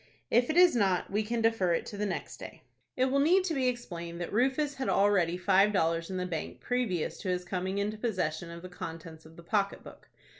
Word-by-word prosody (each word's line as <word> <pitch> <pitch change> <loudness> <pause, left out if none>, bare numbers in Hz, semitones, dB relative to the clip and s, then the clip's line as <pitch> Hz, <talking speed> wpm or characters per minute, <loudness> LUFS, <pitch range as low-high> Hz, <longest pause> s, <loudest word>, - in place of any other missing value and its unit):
"If 240 +1 +3
it 315 - 0
is 355 -5 +7
not, 190 -6 +1
we 210 +2 +1
can 230 +2 -2
defer 225 -6 +2
it - - -3
to - - -7
the 205 +1 -1
next 190 - -5
day." - - -10 0.3
It 255 - +3
will 270 +1 +1
need 355 +7 +4
to 360 -3 -1
be 265 -3 +1
explained 170 -9 -4
that 175 - -5
Rufus 265 +6 +1
had 265 -1 -3
already 195 -4 +3
five 195 +2 +4
dollars 165 -3 0
in 190 - -3
the 180 - -2
bank 165 -3 -5
previous 240 -10 -2
to 190 - -4
his 180 0 -1
coming 190 +1 -3
into 210 +1 -2
possession 175 -8 -2
of 170 +1 -9
the - - -6
contents 165 -3 -8
of 160 - -17
the 170 - -13
pocket 200 +2 -1
book. - - -14
195 Hz, 230 wpm, -30 LUFS, 175-240 Hz, 0.3 s, is